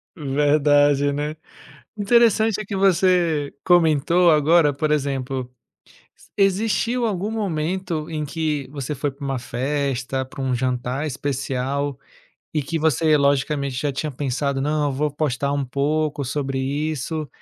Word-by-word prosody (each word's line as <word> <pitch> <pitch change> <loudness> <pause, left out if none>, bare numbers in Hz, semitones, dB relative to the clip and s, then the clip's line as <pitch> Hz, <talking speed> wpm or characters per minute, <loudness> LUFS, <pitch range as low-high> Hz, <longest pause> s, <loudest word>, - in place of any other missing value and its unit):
Verdade, 145 -1 +3
né. 150 +2 -3 0.6
Interessante 220 0 +3
é - - -7
que 200 - -5
você, 180 -6 +2
comentou 170 0 +4
agora 155 0 +4
por 150 +2 -1
exemplo, 135 -3 -2 0.9
existiu 220 +5 +1
algum 205 -1 -2
momento 180 -5 -2
em 155 -2 -3
que 150 -2 -2
você 140 0 -4
foi 145 +1 -2
para 140 +2 -16
uma 135 -1 -2
festa, 130 +1 -2
para 130 +1 -11
um 130 -1 0
jantar 125 +3 -2
especial, 140 0 -2 0.6
e 150 - +1
que 165 +4 -3
você 155 0 +3
logicamente 140 -1 +1
já 140 +2 -1
tinha 150 +2 -3
pensado: 140 +1 -2
"Não 150 +2 0
eu - - -3
vou 150 +3 -1
postar 140 -1 -1
um 140 -1 -1
pouco 145 +2 -1
sobre 135 0 -2
isso", 150 +2 -2
145 Hz, 135 wpm, -22 LUFS, 135-160 Hz, 0.9 s, comentou